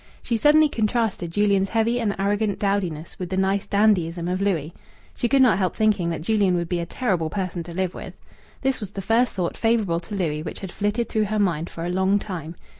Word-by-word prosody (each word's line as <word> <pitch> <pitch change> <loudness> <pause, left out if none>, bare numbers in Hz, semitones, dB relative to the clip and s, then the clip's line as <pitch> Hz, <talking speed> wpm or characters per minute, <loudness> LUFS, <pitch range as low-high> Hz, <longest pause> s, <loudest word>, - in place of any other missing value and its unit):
She 235 - -1
suddenly 300 +6 +5
contrasted 220 - -1
Julian's 200 +1 +2
heavy 230 +2 +1
and 210 -4 0
arrogant 205 +1 0
dowdiness 185 -6 -2
with 180 -2 -4
the 190 - -2
nice 195 +1 +1
dandyism 180 -5 +2
of 185 +2 -1
Louis. 170 -6 -1 0.4
She 240 - -1
could 270 +2 +5
not 245 -5 +4
help 185 -2 0
thinking 210 -6 +2
that 165 -2 -4
Julian 200 -2 +2
would 170 -1 -1
be 175 0 -1
a 170 - -4
terrible 185 -8 -1
person 185 -2 -3
to 170 +1 -8
live 185 +1 -2
with. - - -9 0.5
This 270 -1 0
was 210 -4 -6
the 195 - -5
first 230 +4 +2
thought 180 -3 -2
favourable 220 -7 +1
to 175 +4 -7
Louis 155 -6 -1
which 160 - -7
had 190 -3 -6
flitted 210 +4 -1
through 215 -1 0
her 215 +1 -2
mind 175 -5 0
for 165 - -6
a 175 - -2
long 190 +2 +2
time. 175 -5 -6
195 Hz, 220 wpm, -23 LUFS, 175-215 Hz, 0.5 s, suddenly